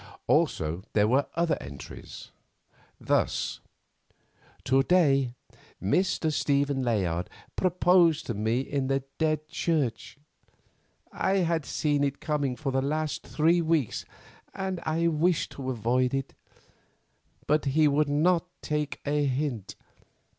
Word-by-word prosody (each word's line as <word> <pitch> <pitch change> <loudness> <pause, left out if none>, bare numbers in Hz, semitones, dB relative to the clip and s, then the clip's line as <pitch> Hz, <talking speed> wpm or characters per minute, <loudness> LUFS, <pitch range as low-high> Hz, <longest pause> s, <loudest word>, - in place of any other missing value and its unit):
Also 80 +3 +1
there 105 0 +4
were 135 +5 +2
other 170 0 +1
entries. 70 -1 -10 0.7
Thus: - - 0 1.0
"To 135 +1 +3
day 135 -6 +3 0.4
Mr. 160 - +1
Stephen 140 -1 +1
Layard 95 -8 0 0.3
proposed 175 -3 +3
to 120 - -2
me 110 +4 0
in 135 -1 -2
the 135 0 0 0.2
Dead 155 -1 0
Church. 145 -8 -1 0.9
I 190 - 0
had 165 -3 -1
seen 145 -2 0
it 140 -1 -1
coming 145 -4 -1
for 140 0 -3
the 135 0 +1
last 150 -1 -2
three 165 +3 +3
weeks 160 -7 0 0.5
and 190 -2 -3 0.4
wished 175 0 +2
to 130 -2 -5
avoid 125 +2 +1
it, 135 0 -3 1.1
but 150 0 +2
he 150 +3 +3
would 145 +1 +2
not 165 +4 +2 0.2
take 150 -1 -2
a 145 0 +1
hint. 130 -6 -2
145 Hz, 120 wpm, -27 LUFS, 130-160 Hz, 1.1 s, there